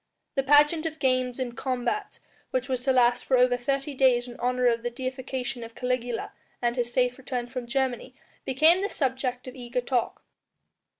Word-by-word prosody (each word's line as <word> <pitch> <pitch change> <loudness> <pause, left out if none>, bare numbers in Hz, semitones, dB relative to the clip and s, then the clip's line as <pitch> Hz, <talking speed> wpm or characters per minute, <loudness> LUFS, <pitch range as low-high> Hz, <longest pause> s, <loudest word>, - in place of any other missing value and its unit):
The 270 - +1
pageant 295 +4 +4
of 315 -1 -6
games 255 -3 +1
and 250 -2 -4
combats 260 - -2 0.3
which 255 0 -1
was 255 -2 -1
to 270 - +4
last 245 -1 +3
for 260 - +2
over 250 0 +4
thirty 275 +3 -2
days 255 -2 +3
in 240 - -9
honour 250 0 0
of 235 -1 +3
the 240 - -2
deification 255 0 -4
of 230 0 -10
Caligula 250 -2 -2 0.3
and 240 -1 0
his 240 -1 -1
safe 250 +1 +1
return 250 -2 -3
from 245 0 -6
Germany 260 0 -2 0.3
became 315 +8 +4
the 405 - -1
subject 260 -2 -2
of 255 - -7
eager 245 -1 -3
talk. 245 -1 -1
255 Hz, 180 wpm, -27 LUFS, 245-265 Hz, 0.3 s, pageant